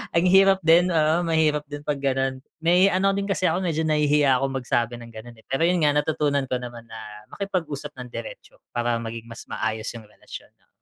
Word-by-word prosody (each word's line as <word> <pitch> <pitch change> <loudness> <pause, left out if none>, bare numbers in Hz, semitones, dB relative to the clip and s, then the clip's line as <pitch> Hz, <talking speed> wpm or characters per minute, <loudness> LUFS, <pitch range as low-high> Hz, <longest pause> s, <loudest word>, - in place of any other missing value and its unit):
ang 170 +2 +3
hirap 195 +1 +5
din, 170 +3 +5
oo, 155 -1 +3
mahirap 155 -2 +2
din 145 - -5
pag 145 -2 -1
gano'n. 135 -1 0 0.2
May 180 +3 +5
ano 195 +2 +2
rin 200 0 -2
kasi 185 -1 +1
ako, 175 - 0
medyo 160 -3 0
nahihiya 150 -3 +3
akong 135 0 -2
magsabi 120 -1 0
ng 115 -1 -11
ganun, 115 +2 -11
eh. - - -22
Pero 135 +5 0
yun 180 0 +2
nga, 150 - +5
natutunan 150 -2 +1
ko - - +2
naman 120 -1 -8
na 115 0 -10 0.4
makipag-usap 155 -7 -4
ng 125 - -7
diretso - - -9 0.2
para 120 0 0
maging 115 0 -7
mas 115 - -9
maayos 110 0 -3
yung 115 - -9
relasyon 105 - -12
'no. - - -36
150 Hz, 205 wpm, -24 LUFS, 120-170 Hz, 0.4 s, hirap